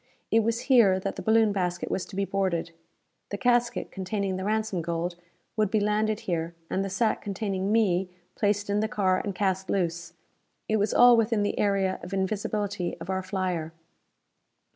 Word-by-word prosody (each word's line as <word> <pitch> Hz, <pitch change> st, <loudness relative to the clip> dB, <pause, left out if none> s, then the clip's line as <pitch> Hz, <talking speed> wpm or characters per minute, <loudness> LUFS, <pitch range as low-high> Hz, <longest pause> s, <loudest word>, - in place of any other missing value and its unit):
It 225 Hz, -, +5 dB
was 230 Hz, +1 st, 0 dB
here 225 Hz, -9 st, +5 dB
that 195 Hz, +1 st, -4 dB
the -, -, -6 dB
balloon 220 Hz, -1 st, +4 dB
basket 180 Hz, -3 st, -2 dB
was 185 Hz, -, -2 dB
to 195 Hz, -, -10 dB
be 200 Hz, 0 st, 0 dB
boarded. 185 Hz, -4 st, -1 dB, 0.6 s
The 205 Hz, -, -4 dB
casket 240 Hz, 0 st, +1 dB
containing 195 Hz, 0 st, -2 dB
the 185 Hz, -, -4 dB
ransom 215 Hz, -3 st, -1 dB
gold 170 Hz, +1 st, -2 dB, 0.4 s
would 215 Hz, -3 st, +1 dB
be 215 Hz, -, +2 dB
landed 210 Hz, +1 st, 0 dB
here, 170 Hz, -1 st, -3 dB, 0.2 s
and 190 Hz, -, 0 dB
the 195 Hz, -, -3 dB
sack 215 Hz, +4 st, 0 dB
containing 195 Hz, -1 st, -2 dB
me 190 Hz, -5 st, +2 dB, 0.2 s
placed 205 Hz, -1 st, 0 dB
in 205 Hz, +1 st, +1 dB
the 215 Hz, -, +1 dB
car 190 Hz, -5 st, +1 dB
and 200 Hz, -2 st, -4 dB
cast 190 Hz, 0 st, -1 dB
loose. 170 Hz, -3 st, -1 dB, 0.5 s
It 220 Hz, -, +2 dB
was 205 Hz, 0 st, +1 dB
all 245 Hz, 0 st, +7 dB
within 225 Hz, -2 st, +2 dB
the 205 Hz, -, -1 dB
area 195 Hz, -2 st, +1 dB
of 180 Hz, -, -8 dB
invisibility 200 Hz, -1 st, -2 dB
of 190 Hz, -, -5 dB
our 190 Hz, 0 st, -1 dB
flyer. 185 Hz, -4 st, -3 dB
195 Hz, 180 wpm, -27 LUFS, 185-215 Hz, 0.6 s, all